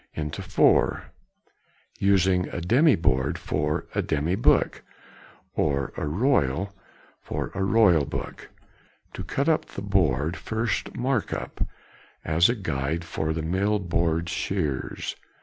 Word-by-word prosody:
into 75 -1 -4
four; - - +2 0.9
using 95 -2 +3
a - - -4
demy 130 - +4
board 70 -3 +1
for 75 0 -1
a - - +1
demy 75 +4 -1
book, 100 - +2 0.7
or 70 -3 0
a 75 - -3
royal 100 - +1 0.5
for - - -4
a 95 - -1
royal 95 -6 +4
book. - - -6 0.6
To - - -5
cut 140 - -1
up 160 -1 +2
the 95 - -8
board, 85 -6 +1
first 110 +2 -2
mark 125 -2 0
up, - - -4 0.6
as 80 +4 +4
a 120 - +1
guide 80 - -2
for 80 -1 -2
the 80 0 -2
mill 95 +6 +1
board 85 -3 0
shears. 70 -4 -2
85 Hz, 130 wpm, -25 LUFS, 75-100 Hz, 0.9 s, demy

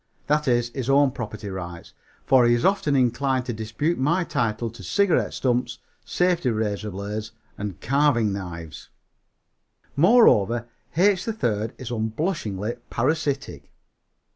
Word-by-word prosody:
That 150 0 +1
is, 120 -1 +2
his 130 +1 -5
own 140 0 +4
property 110 -3 -6
rights, 90 -3 -7 0.3
for 130 -3 +5
he 120 - +4
is 120 - -1
often 190 -7 +2
inclined 130 0 +1
to 120 - -3
dispute 110 +10 -2
my 170 +7 +2
title 115 -6 -1
to 115 - -12
cigarette 180 - +1
stumps, 125 -1 -1 0.3
safety 175 -6 +1
razor 110 -2 -2
blades 105 +3 -5 0.2
and 100 -3 -6
carving 130 -6 +2
knives. 85 -5 -7 1.1
Moreover, 120 - +4 0.3
H. 190 +1 +3
3rd 115 - -1
is 125 -2 -6
unblushingly 110 - -2
parasitic. 140 +2 -2
120 Hz, 125 wpm, -24 LUFS, 110-145 Hz, 1.1 s, for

